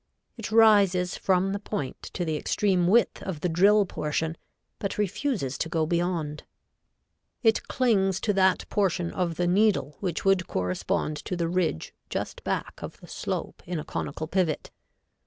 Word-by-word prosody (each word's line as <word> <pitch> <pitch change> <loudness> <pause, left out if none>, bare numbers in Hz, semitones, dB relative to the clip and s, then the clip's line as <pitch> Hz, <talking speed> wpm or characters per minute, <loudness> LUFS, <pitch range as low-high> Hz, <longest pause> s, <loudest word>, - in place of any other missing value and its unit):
It 225 -3 -6
rises 200 -5 +5
from 190 +1 +1
the 200 - -2
point 200 -10 -4
to 175 - -2
the 160 -1 -1
extreme 180 +3 +1
width 230 +5 +3
of 180 -6 -5
the - - +1
drill 200 +5 +4
portion, 160 -1 -2 0.4
but 200 - -3
refuses 205 - -1
to 165 - -1
go 160 -1 +1
beyond. 170 -3 -1 1.0
It 225 -2 +3
clings 195 -7 +2
to 210 - +1
that 190 -1 +2
portion 180 -4 0
of 175 -3 -1
the 175 - 0
needle 180 -7 +2
which 180 -2 -3
would 195 -2 +3
correspond 90 +11 -1
to 180 - -4
the 170 -1 -1
ridge 170 - -1 0.2
just - - -4
back - - -3
of - - -7
the - - -14
slope - - -4
in 175 -1 -2
a - - -6
conical 145 +2 -4
pivot. 170 -2 -1
180 Hz, 160 wpm, -27 LUFS, 160-200 Hz, 1.0 s, rises